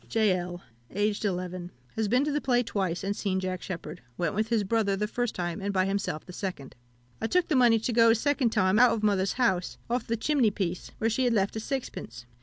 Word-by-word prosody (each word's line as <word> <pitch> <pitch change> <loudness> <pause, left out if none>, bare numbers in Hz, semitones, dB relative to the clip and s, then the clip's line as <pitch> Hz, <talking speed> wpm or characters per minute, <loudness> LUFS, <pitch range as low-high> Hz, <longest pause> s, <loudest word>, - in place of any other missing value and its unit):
"J. 215 -4 +3
L. 175 0 -5 0.3
(aged 205 +1 -1
11). 180 -2 -3 0.3
Has 220 -1 0
been 250 +6 +3
to 300 - 0
the 295 +1 0
play 245 -2 +2
twice, 190 -6 -2
and 200 +1 -1
seen 190 -3 -1
Jack 185 -1 -3
Sheppard. 170 -2 -6 0.2
Went 170 -3 0
with 215 +2 0
his 225 -2 +1
brother 200 -1 +1
the 210 +2 -1
first 245 +1 -2
time, 175 +1 -3
and 200 +1 -1
by 185 -1 +2
himself 195 -5 -2
the 180 - -10
second. 175 -9 -5 0.5
I 225 - 0
took 360 +7 +1
the 305 - +2
money 240 -3 +5
to 225 +2 -2
go 230 0 +6
a 225 - +6
second 275 0 +1
time 190 -1 +2
out 250 0 +6
of 215 - -3
mother's 195 -2 +2
house, 190 -8 0
off 245 -1 -1
the 230 - 0
chimney 265 -1 +2
piece, 185 -3 -3
where 225 - 0
she 240 +3 +1
had 245 - +2
left 200 0 +1
a - - -2
sixpence. 240 - -5
210 Hz, 235 wpm, -28 LUFS, 185-230 Hz, 0.5 s, go